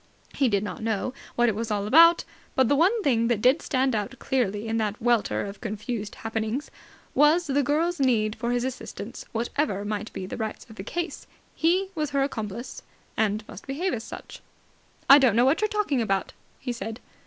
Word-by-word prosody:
He 270 -3 +2
did 200 -2 +1
not 195 -1 -5
know 225 +3 -1 0.2
what 240 0 +3
it 225 - +2
was 225 +2 -3
all 205 -1 -1
about, 335 +9 +7 0.3
but 260 -2 +4
the 285 - +3
one 390 +9 +3
thing 230 -6 +2
that 235 -3 +1
did 255 +8 +4
stand 260 -2 +1
out 210 -2 -2
clearly 225 -5 -1
in 225 0 0
the 210 -2 0
welter 240 -4 +1
of 200 0 -8
confused 215 -1 -4
happenings 225 +4 -3 0.4
was 305 +5 +4
the 285 -1 +1
girl's 315 +5 0
need 225 -5 +2
for 235 - -3
his 245 0 0
assistance. 240 -4 -6
Whatever 230 -3 -1
might 210 +1 -3
be 185 - -5
the 185 - -6
rights 220 -2 -4
of 220 - -14
the 190 - -6
case, 340 - -4 0.3
he 370 +4 +2
was 305 -4 -2
her 280 -1 +1
accomplice, 225 -3 -5 0.3
and 215 0 0
must - - -11
behave 330 +8 -1
as 225 - -3
such. - - -10 0.7
"I 275 +2 +10
don't 255 -6 +4
know 240 +2 +5
what 275 +8 +3
you're 430 - +3
talking 410 - 0
about," 195 -4 -1 0.3
he 255 - -3
said. 225 0 -6
240 Hz, 200 wpm, -26 LUFS, 215-285 Hz, 0.7 s, I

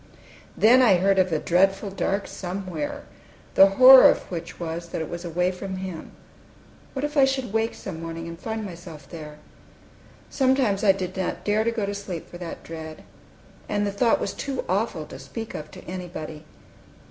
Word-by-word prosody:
Then 245 +4 +6
I 230 -7 +6
heard 190 +2 +3
of 185 -1 +2
a 160 - +2
dreadful 195 +5 +2
dark 195 +1 -1
Somewhere, 180 -4 -5 0.5
the 195 - +8
horror 260 0 +10
of - - +1
which 170 -1 -6
was 170 0 -5
that - - -4
it 160 - -5
was 170 0 -5
away 180 +1 0
from 190 +1 -6
Him. 185 -3 -7 0.8
What 275 +1 -2
if 295 +1 -5
I 280 - +6
should 265 -5 -2
wake 225 +1 0
some 170 -5 -7
morning, 165 0 -6
and 170 0 -8
find 220 +1 -4
myself 170 -6 -10
there? 150 -2 -9 0.9
Sometimes 260 -7 +1
I 200 - +7
did 185 -1 -4
not 190 -1 -3
dare 210 +1 +2
to 230 - +1
go 230 -3 -2
to 200 - -3
sleep 195 -4 -6
for 175 - -11
that 175 -2 -7
dread. 160 -1 -8 0.7
And 205 0 0
the 200 - -1
thought 230 +4 +2
was 195 - -3
too 270 -2 -4
awful 185 -5 -1
to - - -10
speak 225 -1 -7
of 155 0 -7
to - - -12
anybody. 170 -4 -7
190 Hz, 185 wpm, -24 LUFS, 170-215 Hz, 0.9 s, horror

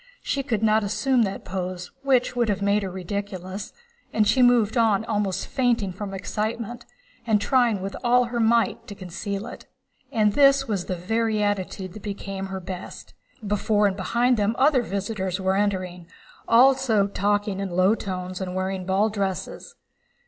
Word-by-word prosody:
She 280 - -1
could 230 -5 -2
not 215 0 +3
assume 225 +5 +1
that 195 0 -5
pose, 180 -1 -5
which 260 -3 +2
would 240 -2 +1
have 200 -1 -1
made 200 +1 +2
her 195 - -3
ridiculous, 190 +1 -5 0.4
and 215 -1 +2
she 260 - +3
moved 245 -2 +4
on 225 -3 +3
almost 205 -3 -1
fainting 235 -7 0
from 200 +1 -6
excitement 220 +4 -4 0.4
and 215 -2 +3
trying 235 -3 +2
with 195 - -4
all 250 +1 +4
her 240 0 -3
might 230 +1 +2
to 205 - -8
conceal 195 +3 -5
it. - - -10 0.4
And 210 -2 +2
this 275 0 +5
was 200 -5 -2
the 185 - -3
very 220 +4 0
attitude 190 -2 -2
that 215 - -10
became 195 -1 -5
her 190 0 -5
best. 180 0 -8 0.3
Before 210 +1 +1
and 195 -2 +1
behind 235 +6 +1
them 210 +2 +1
other 275 -2 +4
visitors 195 -3 -3
were 190 0 +1
entering, 185 -4 -1 0.4
also 250 -3 +5
talking 205 0 0
in 195 -1 -3
low 185 +3 +3
tones 185 -3 -5
and 185 -1 -4
wearing 185 0 -3
ball 195 +3 +2
dresses. 205 - -4
205 Hz, 165 wpm, -24 LUFS, 190-230 Hz, 0.4 s, this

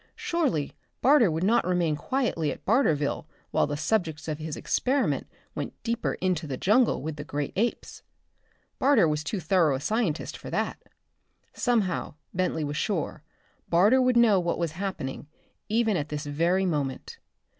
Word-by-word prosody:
Surely 275 - -1 0.3
Barter 260 -6 +6
would 160 +2 -1
not 225 +5 +3
remain 175 -4 +1
quietly 165 - -1
at - - -9
Barterville 155 - +1 0.2
while - - +2
the 145 0 -3
subjects 160 -2 -1
of 155 -1 -3
his 155 -1 -4
experiment 265 +1 0 0.3
went - - -5
deeper 235 0 -1
into 180 -4 -1
the 135 -3 -4
jungle 220 - +3
with 155 0 -4
the 145 - -5
great 145 -1 -4
apes. 230 +5 -2 0.8
Barter 255 - +5
was 150 0 -1
too 190 +6 -3
thorough 165 -4 +3
a - - -3
scientist 190 - -1
for - - -8
that. - - -2 0.7
Somehow, 215 - 0 0.2
Bentley 180 -3 0
was 145 0 -3
sure, 185 -7 -2 0.5
Barter 205 +10 +5
would 250 -1 +3
know 220 -5 +5
what 170 -1 -1
was 170 -2 -1
happening, 165 -6 -5 0.4
even 220 -1 +2
at 150 -3 -2
this 150 0 -4
very 170 +6 +1
moment. 145 -6 -3
175 Hz, 155 wpm, -27 LUFS, 150-220 Hz, 0.8 s, Barter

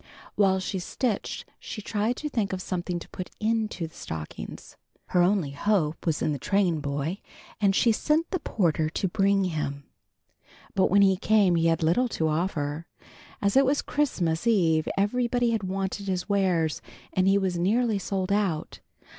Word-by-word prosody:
While 190 -2 +3
she 190 0 -3
stitched 215 +4 -2
she - - -7
tried 215 +3 -1
to 300 - -4
think 220 -9 -1
of 185 - -3
something 180 -1 -3
to 170 - -9
put 185 - -6
into 220 -5 -1
the 160 - -11
stockings. 80 -1 -7 0.3
Her 180 - +3
only 175 -5 +2
hope 165 0 0
was 155 -2 +1
in 150 - +1
the 140 - -4
trainboy, 160 -3 0 0.4
and 195 -2 +3
she 230 - +4
sent 305 +8 +1
the 370 - 0
porter 160 - 0
to 190 - -1
bring 195 +1 +2
him. 150 -5 -3 0.9
But 190 - +3
when 200 +2 +5
he 190 -1 +4
came 205 -2 +3
he 165 -1 +2
had 165 0 +1
little 175 +11 +3
to 160 - +1
offer. 155 -1 -2 0.6
As 200 0 +2
it 270 - +7
was 275 +2 +1
Christmas 185 - 0
eve 165 -8 +3
everybody 240 +3 +1
had 225 -2 0
wanted 195 +1 -3
his 185 -2 -2
wares 185 -6 +1 0.3
and 185 0 +2
he 195 +1 +5
was 185 -3 -1
nearly 215 +3 +2
sold 190 0 -2
out. 195 -6 -1
190 Hz, 170 wpm, -26 LUFS, 165-210 Hz, 0.9 s, it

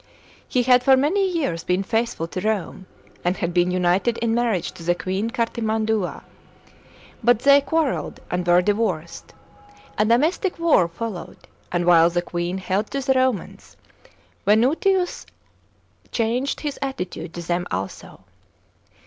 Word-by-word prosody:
He 250 - +1
had 250 0 +5
for 265 +1 +5
many 375 +8 +2
years 275 - -2
been 180 +2 0
faithful 225 -5 -1
to 185 - -4
Rome, 200 -3 -2 0.4
and 175 +1 0
had 170 0 -2
been 175 0 +2
united 185 +6 +1
in 230 -1 0
marriage 230 -7 0
to - - -14
the 175 +1 +1
queen 190 +5 -2
Cartimand'ia. 220 -3 -1 1.0
But 245 -1 +5
they 280 +1 +6
quarrelled 310 -1 -1
and 180 0 -2
were 175 +1 +5
divotdd; 190 -6 -1 0.7
a 215 - +4
domestic 310 - +1
war 330 - +3
followed, 175 0 -6 0.3
and 175 -1 0
while 170 -1 +6
the 175 0 -1
queen 175 +1 -3
held 190 +3 -2
to 275 - -3
the 265 0 +2
Romans, 255 -4 -2 0.7
Venutius 320 - +2 0.8
c 230 - 0
anged 245 +5 -1
his 295 -2 -4
attitude 225 - -5
to 175 - -5
them 175 +1 -2
also. 95 +1 -6
215 Hz, 140 wpm, -22 LUFS, 175-255 Hz, 1.0 s, they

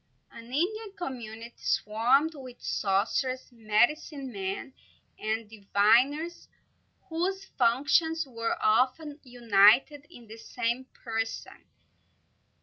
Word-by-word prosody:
An 230 - -12
Indian 385 - -2
community 235 - -7
swarmed 245 +9 +2
with 255 -4 -11
sorcerers, 230 +7 -1
medicine 245 +5 0
men, 195 +4 -5 0.5
and 220 +1 -2
diviners, 235 +10 +1 0.6
whose 380 +3 -2
functions 320 +5 +2
were 230 -3 -3
often 265 +7 +1
united 245 +4 +4
in 245 -9 -14
the 220 +1 -11
same 240 +2 -3 0.2
person. 225 -1 -4
245 Hz, 90 wpm, -28 LUFS, 225-295 Hz, 0.6 s, united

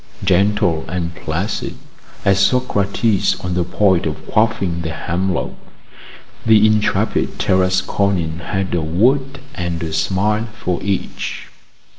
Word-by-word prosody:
Gentle 95 -3 +2
and 85 0 -3
placid 85 +4 -3 0.5
as 100 0 +4
Socrates 105 -2 +2
on 90 0 -3
the 90 0 +1
point 95 0 +2
of - - -5
quaffing 105 -6 +1
the 80 - -3
hemlock, 90 +3 -2 0.9
the 110 -1 +5
intrepid 110 -1 +1
Tarasconian 95 -2 +1
had 95 +3 -3
a 85 - +1
word 130 - +1
and 85 -4 -3
a 80 -1 -4
smile 100 +7 0
for 90 -3 -2
each. 100 -1 -3
95 Hz, 115 wpm, -19 LUFS, 85-105 Hz, 0.9 s, the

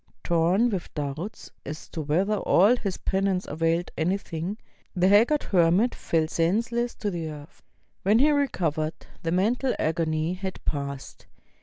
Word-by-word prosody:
Tom 180 +8 +2
with 185 -4 -4
doubts 150 +8 -5
as 155 +2 -7
to 160 - -5
whether 185 +8 +1
all 200 +4 +4
his 200 -6 -3
penance 190 -1 0
availed 165 +3 -1
anything, 180 +2 -2 0.4
the 180 0 +3
haggard 230 +9 +4
hermit 185 +6 +3
fell 160 -1 0
senseless 230 +9 0
to 205 - -3
the 165 -3 -4
earth. 150 0 -11 0.4
When 210 +3 +4
he 290 +5 +5
recovered, 165 - 0 0.3
the 165 - -2
mental 230 +9 +1
agony 160 +1 0
had 190 0 -5
passed. 140 -2 -5
180 Hz, 140 wpm, -26 LUFS, 160-210 Hz, 0.4 s, he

